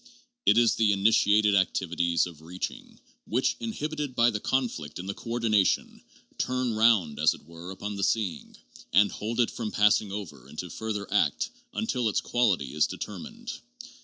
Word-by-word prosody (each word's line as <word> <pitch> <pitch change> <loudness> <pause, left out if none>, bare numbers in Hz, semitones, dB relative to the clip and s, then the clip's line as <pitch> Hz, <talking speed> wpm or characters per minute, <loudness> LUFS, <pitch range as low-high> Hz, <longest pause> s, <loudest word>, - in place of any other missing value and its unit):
It - - +6
is 120 -1 +5
the 110 -2 +3
initiated 105 0 +4
activities 85 -3 +1
of 85 -3 -10
reaching, 90 +3 -7 0.3
which, 125 +5 +1
inhibited 155 - -4
by 120 +1 +4
the 105 - -2
conflict 110 - -2
in 90 - -6
the 100 - -3
coordination, 115 -4 0 0.4
turn 125 -2 0
round, 110 -9 +3
as 80 +1 +4
it - - -18
were, 85 +2 -10
upon 100 +2 -5
the 100 - -2
seeing, 105 -5 -1 0.3
and 100 0 +5
hold 115 +3 -4
it 120 - +3
from 115 -3 -4
passing 105 -1 +3
over 85 -11 -7
into 85 +2 -6
further 105 0 -4
act 165 - +1 0.2
until 125 - 0
its 105 - +1
quality 95 - +1
is 75 0 +3
de - - -7
termined. 230 - -7
105 Hz, 160 wpm, -27 LUFS, 90-120 Hz, 0.4 s, It